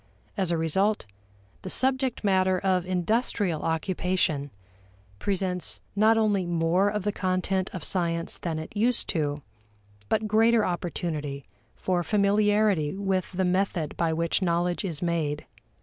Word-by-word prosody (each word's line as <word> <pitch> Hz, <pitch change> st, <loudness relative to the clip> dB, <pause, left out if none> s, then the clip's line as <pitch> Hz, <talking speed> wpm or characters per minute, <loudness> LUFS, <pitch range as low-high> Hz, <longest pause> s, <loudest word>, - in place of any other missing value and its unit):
As 190 Hz, -4 st, 0 dB
a 170 Hz, -, +1 dB
result, 190 Hz, +7 st, +1 dB, 0.6 s
the 185 Hz, -, -6 dB
subject 260 Hz, +2 st, +1 dB
matter 190 Hz, -2 st, +3 dB
of 185 Hz, -1 st, 0 dB
industrial 185 Hz, -2 st, 0 dB
occupation 165 Hz, -3 st, 0 dB, 0.7 s
presents 185 Hz, -, -2 dB, 0.2 s
not 220 Hz, +2 st, +4 dB
only 210 Hz, -4 st, +2 dB
more 175 Hz, +3 st, +2 dB
of 210 Hz, -1 st, -2 dB
the 205 Hz, -, 0 dB
content 185 Hz, 0 st, -1 dB
of 180 Hz, -, -6 dB
science 170 Hz, -2 st, -2 dB
than 165 Hz, -2 st, -3 dB
it 160 Hz, +6 st, -7 dB
used 235 Hz, +3 st, +3 dB
to, 145 Hz, -4 st, -1 dB, 0.7 s
but 215 Hz, 0 st, +1 dB
greater 225 Hz, +1 st, +4 dB
opportunity 155 Hz, -5 st, -3 dB, 0.3 s
for 180 Hz, -2 st, 0 dB
familiarity 205 Hz, -3 st, +2 dB
with 190 Hz, -2 st, -1 dB
the 185 Hz, +1 st, 0 dB
method 180 Hz, -4 st, 0 dB
by 165 Hz, -1 st, +1 dB
which 165 Hz, +4 st, 0 dB
knowledge 175 Hz, 0 st, 0 dB
is 170 Hz, -4 st, -3 dB
made. 155 Hz, -4 st, -1 dB
185 Hz, 135 wpm, -27 LUFS, 170-205 Hz, 0.7 s, not